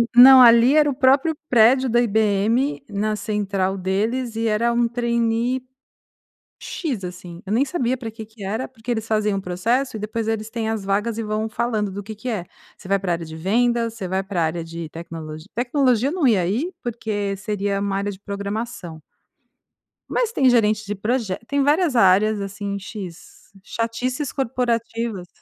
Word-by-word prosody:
não 260 Hz, +1 st, +10 dB
ali 235 Hz, +2 st, +7 dB
era 300 Hz, -1 st, +5 dB
o -, -, -1 dB
próprio 275 Hz, +4 st, +3 dB
prédio 250 Hz, +2 st, +5 dB
da 240 Hz, +1 st, +3 dB
IBM 220 Hz, +5 st, +1 dB
na 210 Hz, +1 st, -1 dB
central 200 Hz, -3 st, -1 dB
deles 220 Hz, +6 st, -1 dB
e 230 Hz, -, 0 dB
era 225 Hz, +2 st, +2 dB
um 235 Hz, 0 st, +2 dB
trainee 235 Hz, +1 st, 0 dB, 1.0 s
x 260 Hz, -, -4 dB
assim, 180 Hz, -1 st, -8 dB
eu 200 Hz, -, -2 dB
nem 255 Hz, +5 st, +3 dB
sabia 260 Hz, -5 st, -1 dB
pra 230 Hz, -3 st, -6 dB
que 220 Hz, 0 st, -9 dB
que 220 Hz, -1 st, -13 dB
era 220 Hz, +6 st, -3 dB
porque 240 Hz, -2 st, -13 dB
eles 220 Hz, -1 st, -2 dB
faziam 215 Hz, -2 st, +1 dB
um -, -, -3 dB
processo 225 Hz, +9 st, -1 dB
e -, -, -4 dB
depois 220 Hz, +1 st, -3 dB
eles 220 Hz, 0 st, -2 dB
têm 225 Hz, -2 st, -3 dB
as 220 Hz, -3 st, -2 dB
vagas 210 Hz, +3 st, -1 dB
e -, -, -2 dB
vão 215 Hz, +1 st, -2 dB
falando 220 Hz, -2 st, -1 dB
do 200 Hz, +2 st, -5 dB
que 215 Hz, +2 st, -8 dB
que 250 Hz, +4 st, -6 dB
é, 195 Hz, -6 st, -3 dB, 0.3 s
você 190 Hz, -, -13 dB
vai 200 Hz, -, +3 dB
pra 185 Hz, -2 st, -2 dB
área 170 Hz, 0 st, -4 dB
de 160 Hz, 0 st, -9 dB
vendas, 230 Hz, +6 st, +1 dB
você 200 Hz, -5 st, -5 dB
vai 190 Hz, +1 st, -1 dB
pra 190 Hz, -3 st, -2 dB
área 165 Hz, +1 st, -2 dB
de 165 Hz, -1 st, -7 dB
tecnologia 160 Hz, -1 st, -8 dB
tecnologia 250 Hz, 0 st, +2 dB
não 345 Hz, -3 st, 0 dB
ia 190 Hz, -7 st, +3 dB
ir 275 Hz, -, -1 dB
porque 215 Hz, -4 st, -3 dB
seria 200 Hz, -1 st, -2 dB
uma 200 Hz, -1 st, -1 dB
área 200 Hz, +1 st, -2 dB
de 190 Hz, -, -11 dB
programação 200 Hz, -4 st, -5 dB, 1.1 s
Mas 470 Hz, -2 st, 0 dB
tem 265 Hz, -, +3 dB
gerente 215 Hz, -3 st, +2 dB
de 205 Hz, +1 st, -3 dB
proje 210 Hz, -1 st, -1 dB
tem 280 Hz, 0 st, +1 dB
várias 295 Hz, -1 st, +2 dB
áreas 205 Hz, +1 st, +4 dB
assim 200 Hz, 0 st, -4 dB
x 195 Hz, -4 st, -10 dB
chatices 245 Hz, +6 st, -3 dB
corporativas. 230 Hz, -6 st, -2 dB
220 Hz, 180 wpm, -22 LUFS, 200-240 Hz, 1.1 s, não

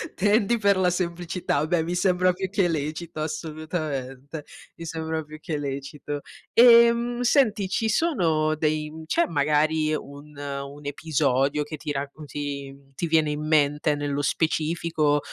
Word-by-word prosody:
tendi 210 Hz, +3 st, +3 dB
per 200 Hz, -3 st, +3 dB
la 185 Hz, -1 st, +3 dB
semplicità, 175 Hz, -3 st, -1 dB
beh 170 Hz, -1 st, +1 dB
mi 175 Hz, +2 st, -2 dB
sembra 180 Hz, 0 st, +3 dB
più 185 Hz, +1 st, -4 dB
che 195 Hz, -3 st, +1 dB
lecito 155 Hz, +1 st, -3 dB
assolutamente, 155 Hz, -3 st, -4 dB, 0.3 s
mi 165 Hz, -, -8 dB
sembra 160 Hz, 0 st, -3 dB
più 155 Hz, 0 st, -11 dB
che 155 Hz, -1 st, -3 dB
lecito. 140 Hz, +1 st, -5 dB, 0.3 s
Ehm, 235 Hz, 0 st, +6 dB
senti 225 Hz, -7 st, +3 dB
ci 220 Hz, +3 st, 0 dB
sono 165 Hz, -, +2 dB
dei 155 Hz, 0 st, -2 dB
c'è 335 Hz, -, +2 dB
magari 155 Hz, +1 st, +2 dB
un 145 Hz, +1 st, -9 dB
un 140 Hz, 0 st, -6 dB
episodio, 145 Hz, -1 st, +1 dB
che 150 Hz, +2 st, -7 dB
ti 150 Hz, 0 st, -5 dB
raccon 145 Hz, +2 st, -5 dB
ti 140 Hz, -1 st, -5 dB, 0.2 s
ti 170 Hz, -, -2 dB
viene 155 Hz, -2 st, +3 dB
in 150 Hz, +1 st, -3 dB
mente 150 Hz, 0 st, +2 dB
nello 145 Hz, 0 st, -2 dB
specifico 155 Hz, 0 st, +1 dB
155 Hz, 140 wpm, -25 LUFS, 145-180 Hz, 0.3 s, Ehm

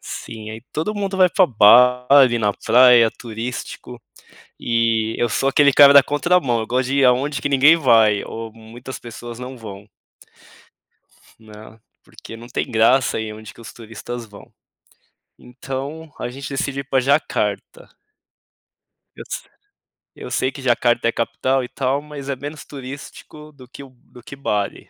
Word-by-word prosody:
Sim, 110 Hz, -1 st, -9 dB
aí 110 Hz, +1 st, -9 dB
todo 185 Hz, +8 st, -2 dB
mundo 195 Hz, -2 st, -3 dB
vai 185 Hz, -1 st, +5 dB
para 185 Hz, +1 st, +3 dB
Bali, 125 Hz, +2 st, +5 dB
na 105 Hz, -2 st, 0 dB
praia, 120 Hz, 0 st, +5 dB
turístico, 120 Hz, +1 st, -8 dB, 0.6 s
e 115 Hz, -1 st, 0 dB
eu 120 Hz, -, 0 dB
sou 135 Hz, +5 st, 0 dB
aquele 140 Hz, 0 st, +4 dB
cara 140 Hz, 0 st, +7 dB
da 140 Hz, -, +9 dB
contramão, 145 Hz, -5 st, 0 dB
eu 110 Hz, -, -5 dB
gosto 125 Hz, +2 st, -1 dB
de 140 Hz, -, 0 dB
ir 135 Hz, -, +4 dB
aonde 135 Hz, +4 st, +1 dB
que -, -, -2 dB
ninguém 145 Hz, +4 st, +5 dB
vai, 115 Hz, -8 st, +3 dB
ou 115 Hz, -1 st, -8 dB
muitas 115 Hz, +3 st, -11 dB
pessoas 120 Hz, 0 st, -10 dB
não 125 Hz, +1 st, -8 dB
vão. 105 Hz, -3 st, -11 dB, 1.5 s
Né, 110 Hz, 0 st, -15 dB, 0.2 s
porque -, -, -13 dB
não 120 Hz, +1 st, -12 dB
tem 130 Hz, -, -4 dB
graça 115 Hz, +1 st, +2 dB
ir 110 Hz, -1 st, -5 dB
aonde 110 Hz, +1 st, -11 dB
que -, -, -16 dB
os 115 Hz, -, -11 dB
turistas 115 Hz, +1 st, -9 dB
vão. 105 Hz, -2 st, -16 dB, 0.9 s
Então 135 Hz, +5 st, -8 dB
a -, -, -4 dB
gente 135 Hz, +2 st, -8 dB
decidiu 140 Hz, 0 st, -3 dB
ir -, -, -14 dB
pra 135 Hz, -, +2 dB
Jacarta. 145 Hz, -, -2 dB, 1.3 s
Eu -, -, -9 dB
se -, -, -7 dB, 0.7 s
eu -, -, -9 dB
sei 130 Hz, -, -1 dB
que 140 Hz, -, -11 dB
Jacarta 120 Hz, -2 st, +1 dB
é -, -, +2 dB
capital 130 Hz, +3 st, -1 dB
e -, -, -6 dB
tal, 135 Hz, +1 st, -1 dB
mas 145 Hz, -2 st, -10 dB
é 140 Hz, -, -1 dB
menos 145 Hz, +4 st, -8 dB
turístico 140 Hz, +2 st, -11 dB
do 135 Hz, -3 st, -15 dB
que 135 Hz, -, -12 dB
o 135 Hz, -, -14 dB
do 120 Hz, -, -17 dB
que 140 Hz, -, -11 dB
Bali. 105 Hz, -7 st, -4 dB
125 Hz, 165 wpm, -20 LUFS, 115-140 Hz, 1.5 s, da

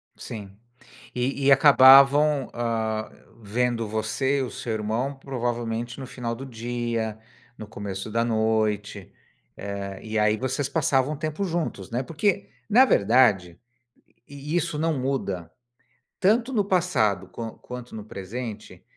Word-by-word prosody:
Sim. 100 Hz, -4 st, -8 dB, 0.6 s
E 135 Hz, +2 st, -1 dB
e 140 Hz, -, +6 dB
acabavam, 135 Hz, +1 st, +7 dB
hã, 110 Hz, -2 st, -2 dB, 0.3 s
vendo 115 Hz, +1 st, -1 dB
você 110 Hz, +6 st, -1 dB
e -, -, 0 dB
o 125 Hz, -, -5 dB
seu 115 Hz, -, -5 dB
irmão, 110 Hz, +6 st, -2 dB
provavelmente, 120 Hz, -2 st, -3 dB
no 130 Hz, -, -6 dB
final 120 Hz, -2 st, -4 dB
do 135 Hz, -, -8 dB
dia, 115 Hz, -2 st, -3 dB, 0.4 s
no 110 Hz, -, -8 dB
começo 100 Hz, -1 st, -6 dB
da 115 Hz, +1 st, +1 dB
noite. 110 Hz, -3 st, -1 dB, 0.5 s
Eh, 100 Hz, -1 st, -6 dB
e 110 Hz, -1 st, -2 dB
aí 105 Hz, 0 st, +3 dB
vocês 130 Hz, +3 st, -2 dB
passavam 140 Hz, -2 st, +1 dB
um 150 Hz, -, -7 dB
tempo 155 Hz, +5 st, -3 dB
juntos, 165 Hz, -, -3 dB
né? 125 Hz, +3 st, -1 dB
Porque, 155 Hz, -, -1 dB, 0.2 s
na 255 Hz, +5 st, +7 dB
verdade, 100 Hz, -, +3 dB, 0.7 s
e 145 Hz, +3 st, -6 dB
isso 170 Hz, -3 st, 0 dB
não 160 Hz, -3 st, 0 dB
muda. 100 Hz, -11 st, -3 dB, 0.7 s
Tanto 230 Hz, +6 st, +2 dB
no 210 Hz, -4 st, +2 dB
passado, 120 Hz, -, +1 dB
quan 115 Hz, +4 st, -6 dB
quanto 125 Hz, -2 st, -9 dB
no 105 Hz, -, -6 dB
presente, 110 Hz, +2 st, -7 dB
120 Hz, 135 wpm, -25 LUFS, 110-140 Hz, 0.7 s, acabavam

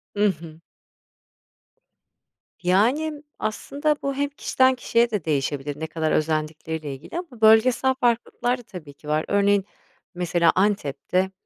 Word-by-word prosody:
I -, -, -5 dB
hı. 160 Hz, -3 st, -7 dB, 2.0 s
Yani, 275 Hz, -, +1 dB, 0.2 s
aslında 285 Hz, +7 st, -1 dB
bu 275 Hz, -, -1 dB
hem 285 Hz, +1 st, 0 dB
kişiden 260 Hz, -2 st, +2 dB
kişiye 235 Hz, -1 st, +1 dB
de 205 Hz, -7 st, -2 dB
değişebilir, 145 Hz, -1 st, -2 dB
ne 160 Hz, -, -3 dB
kadar 160 Hz, -1 st, -2 dB
özendikleriyle 155 Hz, -1 st, -2 dB
ilgili 150 Hz, -, -8 dB
ama 270 Hz, -11 st, -11 dB
bölgesel 230 Hz, +4 st, +5 dB
farklılıklar 240 Hz, 0 st, 0 dB
da 245 Hz, -, -12 dB
tabii 165 Hz, -9 st, -10 dB
ki 150 Hz, +1 st, -16 dB
var. 155 Hz, +1 st, 0 dB
Örneğin 200 Hz, -1 st, +2 dB, 0.5 s
mesela 175 Hz, -1 st, +2 dB
Antep'te, 190 Hz, -1 st, 0 dB
195 Hz, 125 wpm, -24 LUFS, 155-245 Hz, 2.0 s, bölgesel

